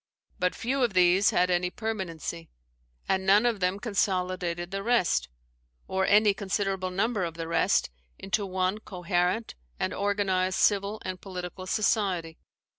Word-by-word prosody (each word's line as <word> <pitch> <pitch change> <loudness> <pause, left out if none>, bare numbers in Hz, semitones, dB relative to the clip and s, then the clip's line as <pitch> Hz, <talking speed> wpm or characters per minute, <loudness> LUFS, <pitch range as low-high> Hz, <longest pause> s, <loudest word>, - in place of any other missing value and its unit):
But 180 0 +1
few 260 +3 -1
of 225 -6 0
these 185 +2 +5
had 180 +1 +2
any 180 0 +1
permanency; 175 -6 -5 0.6
and 190 0 +1
none 200 +4 +5
of 235 -4 +1
them 185 +2 0
consolidated 185 -4 -1
the 195 0 -3
rest, 185 - +1 0.6
or 190 0 0
any 210 0 +5
considerable 195 -1 -2
number 200 +2 0
of 165 -2 -4
the 165 -1 -5
rest, 165 - +2 0.3
into 200 +2 -1
one 185 +1 -1
coherent 180 +2 -1 0.3
and - - -1
organized 195 -2 0
civil 205 +1 +2
and 185 -1 -5
political 185 -1 -7
society. 190 -6 0
190 Hz, 140 wpm, -28 LUFS, 180-205 Hz, 0.6 s, these